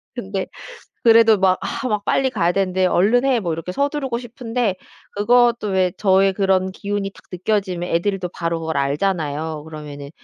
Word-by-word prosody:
근데 195 -5 -3 0.6
그래도 225 -1 +6
막 185 -1 +3
아 260 - -3
막 210 -3 -1
빨리 265 -1 +2
가야 175 -9 +1
되는데 185 0 +1
"얼른 210 +8 +3
해." 260 -3 +3
뭐 175 -6 -2
이렇게 165 +3 -5
서두르고 280 +1 -1
싶은데 240 -3 -2 0.4
그것도 235 +1 +3
왜 185 -2 +2
저의 195 -1 +3
그런 190 -1 +1
기운이 200 0 -3
딱 - - -18
느껴지면 185 -1 -2
애들도 185 +2 0
바로 165 -1 -2
뭘 160 0 -4
알잖아요. 150 0 -1
그러면은 150 -2 -9
195 Hz, 345 characters per minute, -20 LUFS, 175-225 Hz, 0.6 s, 그래도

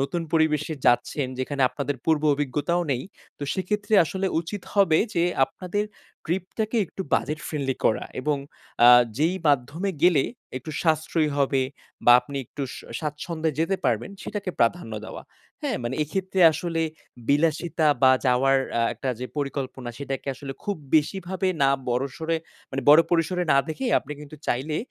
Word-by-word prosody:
নতুন 155 +5 -1
পরিবেশে 160 -1 +2
যাচ্ছেন, 130 +3 +2
যেখানে 135 +1 -1
আপনাদের 145 -1 -3
পূর্ব 160 -2 +2
অভিজ্ঞতাও 145 +5 0
নেই 125 - -2 0.4
তো - - -7
সেক্ষেত্রে 205 +3 -1
আসলে 190 +5 -2
উচিত 180 +4 -6
হবে 190 -6 +4 0.2
যে 170 0 +3 0.2
আপনাদের 185 +7 -3 0.4
ট্রিপটাকে 190 +6 -2
একটু 190 - -6
বাজেট 150 +2 0
ফ্রেন্ডলি 140 -4 -2
করা, 110 - +2 0.2
এবং 145 +2 0 0.5
আ - - +10 0.3
যেই 170 +5 +2
মাধ্যমে 145 +8 +1
গেলে 170 -6 +5 0.3
একটু 130 +5 -6
সাশ্রয়ী 160 -1 +1
হবে 135 -1 +2 0.4
বা, 120 - +8
আপনি 140 +3 -8
একটু 140 +4 -7
স - - -8 0.2
স্বাচ্ছন্দে 155 +2 -2
যেতে 165 +4 +1
পারবেন 115 - 0
সেটাকে 200 -3 -4
প্রাধান্য 115 -1 +1
দেওয়া। - - -8 0.4
হ্যাঁ? - - -1
মানে 120 +2 -2
এক্ষেত্রে 190 +5 -2
আসলে 165 +1 -2 0.5
বিলাসিতা 155 +2 +2 0.2
বা, 130 - +8 0.2
যাওয়ার 135 +2 +4 0.2
আ - - +3
একটা 135 - -5
যে 125 - -3
পরিকল্পনা 135 -3 -4
সেটাকে 135 0 -4
আসলে 135 +1 -7
খুব 205 - -1 0.2
বেশিভাবে 185 +4 +1
না 135 - +5 0.2
বড় 125 +2 +1
সরে 165 0 -1 0.3
মানে 135 0 -3
বড় 150 +2 +9
পরিসরে 175 +1 +1
না 140 - +5
দেখেই 245 +11 -2
আপনি 150 - -8
কিন্তু 150 +1 -10
চাইলে 145 +5 -1
155 Hz, 155 wpm, -25 LUFS, 135-175 Hz, 0.5 s, আ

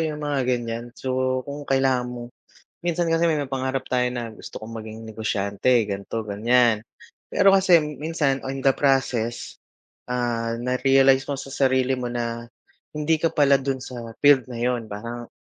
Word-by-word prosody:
yung 155 -2 -2
mga, 145 -2 0
ganyan, 120 -1 -1
so, 130 -1 -1
kung 145 +1 -6
kailangan 130 -2 +2
mo 120 -1 -6 0.6
Minsan 175 0 0
kasi 165 0 +3
may 155 - +1
mga 140 -2 -3
pangarap 130 0 -2
tayo 125 -1 +1
na 120 -2 -5
gusto - - -9
kong 110 +1 -9
maging 110 0 -9
negosyante 110 +2 0
ganito, 100 +2 -5
ganyan. 115 +2 +3 0.5
Pero 195 -1 +5
kasi 185 -3 +6
minsan 150 -2 -1
on 135 +1 -4
the 135 0 +3
process, 130 -4 0 0.4
ah, 120 -2 -2
narealize 135 +1 +3
mo 140 - -4
sa 135 - -9
sarili 130 -1 +1
mo 120 -1 -4
na 115 -1 -3 0.5
hindi 150 +1 +1
ka 165 +1 0
pala 140 -2 +5
dun 135 -1 -3
sa 125 -1 -8 0.2
field 145 -3 +6
na 120 -2 -7
yun. 120 -1 0
Parang 120 +3 -6
130 Hz, 165 wpm, -24 LUFS, 120-140 Hz, 0.6 s, kasi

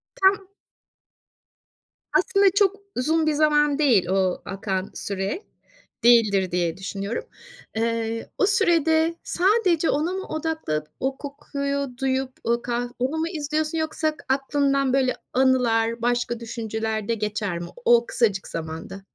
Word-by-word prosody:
Tam 385 0 +2 1.7
Aslında 400 0 +2
çok 405 -1 +4 0.2
uzun 315 +5 +1
bir 310 - +3
zaman 295 -1 +3
değil 240 - +4
o 185 -1 +1
akan 190 0 -3
süre. 200 - -3 0.6
Değildir 215 -6 +5
diye 175 -1 0
düşünüyorum. 195 +3 -4 0.5
Iıı, 230 0 -1
o - - +3
sürede 330 -4 +3
sadece 365 -3 +2
ona 310 +5 +1
mı 380 0 -4
odakla 315 - -2 0.2
o 265 0 -1
kokuyu 280 -1 -3
duyup 265 0 0
o 235 +1 +1
kah 240 0 -2
onu 265 +6 -1
mu 320 - 0
izliyorsun 310 -1 -2
yoksa 315 -1 -1
aklından 275 0 +1
böyle 260 -2 +2 0.2
anılar 240 -3 +2
başka 240 0 0
düşünceler 220 -2 -3
de 230 - +1
geçer 210 -4 -2
mi? 170 - -6 0.2
O 235 0 +5
kısacık 210 -5 0
zamanda. 165 +4 -6
255 Hz, 125 wpm, -24 LUFS, 220-310 Hz, 1.7 s, Değildir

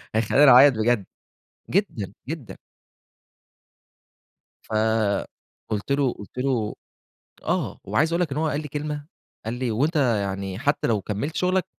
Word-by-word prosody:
هيخلّيني 130 +6 +5
أعيّط 135 +2 +8
بجد 110 -2 +1 0.6
جدًا، 125 - -1
جدًا. 150 -6 -6 2.1
فقُلت 110 +1 -2
له 140 -3 +2
قُلت 105 +5 -12
له 125 -5 0 0.7
آه، - - -1
وعايز 160 +2 +1
أقول 170 - +1
لك 160 -6 0
إن - - -3
هو 160 0 +1
قال 145 0 -1
لي 150 - -7
كلمة، 145 0 -4 0.4
قال 115 +2 -3
لي 125 -1 -2
"وأنت 145 +9 0
يعني 100 -7 0
حتى 145 0 0
لو 110 -3 +1
كمّلت 110 - -3
شُغلك، 185 0 +1
125 Hz, 130 wpm, -24 LUFS, 110-150 Hz, 2.1 s, أعيّط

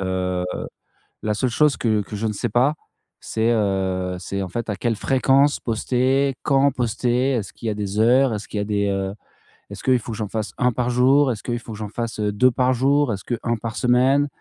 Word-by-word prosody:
Heu, 90 -1 -1 0.8
la 105 - 0
seule 115 +5 0
chose 150 +4 +2
que 110 -3 +1
que 100 - -10
je 105 +2 -2
ne 105 - -2
sais 100 - -2
pas, 130 +7 +3 0.5
c'est 115 +1 0
heu, 95 -4 0
c'est 100 +2 -4
en 95 - -4
fait, 115 +4 -4
à 105 - -2
quelle 115 +3 -1
fréquence 135 +4 +2
poster, 130 +4 +1
quand 140 0 +3
poster? 125 +1 0
Est-ce 105 -8 -3
qu'il - - -8
y - - +1
a 105 - -2
des 100 0 -4
heures 125 +2 +4
est-ce 105 0 -5
qu'il 105 - -5
y - - 0
a - - -1
des, 100 -1 0
heu 95 0 -2 0.6
est-ce - - -9
que 130 - +2
il 125 - +4
faut 115 - -7
que 110 - -6
j'en 110 - -3
fasse 110 -1 -4
1 125 0 +2
par 125 +1 -1
jour? 130 +3 +4
Est-ce 110 - -5
que - - -4
il 120 - -1
faut 115 -1 -9
que - - -8
j'en 105 -1 -5
fasse, 115 +1 -5
heu, 105 -1 0
2 125 +5 +4
par 130 +1 +1
jour? 135 0 +2
Est-ce 95 - -6
que 120 - -2
1 120 0 0
par 115 0 -6
semaine? 130 +4 +3
115 Hz, 245 wpm, -22 LUFS, 105-130 Hz, 0.8 s, heures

